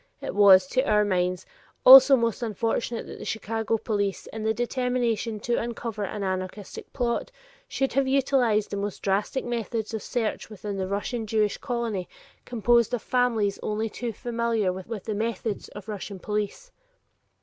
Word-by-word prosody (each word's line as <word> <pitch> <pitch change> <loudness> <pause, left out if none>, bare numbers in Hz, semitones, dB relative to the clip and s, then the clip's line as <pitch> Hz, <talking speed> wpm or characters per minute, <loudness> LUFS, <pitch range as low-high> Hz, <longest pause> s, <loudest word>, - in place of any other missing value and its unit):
It - - -5
was, 195 -2 +7
to 260 - +2
our 210 -6 +2
minds, 180 -2 0 0.4
also 270 +1 +11
most 230 -2 -1
unfortunate 230 +1 -2
that - - -9
the - - -7
Chicago 225 0 -2
police 205 -3 -2
in 220 - -5
the 220 +1 +1
determination 240 -2 -1
to 240 +2 0
uncover 230 -2 -4
an 200 +1 -4
anarchistic 185 +1 -5
plot 245 - -1 0.4
should 270 0 -1
have 275 0 +2
utilized 260 -6 +2
the 200 - -2
most 200 0 -4
drastic 200 +7 0
methods 230 -2 -3
of 220 - -3
search 225 -1 -3
within 205 -1 -6
the 190 -1 -2
Russian 215 +4 -3
Jewish 215 -1 +1
colony 235 -7 -3 0.4
composed 240 0 +2
of 235 - -7
families 235 -5 +1
only 215 +1 -2
too 235 +2 -4
familiar 230 -3 -1
with 190 +2 -7
the 220 - -3
methods 220 -1 -3
of 205 0 -11
Russian 205 -1 -6
police. 210 - -4
220 Hz, 160 wpm, -26 LUFS, 205-240 Hz, 0.4 s, also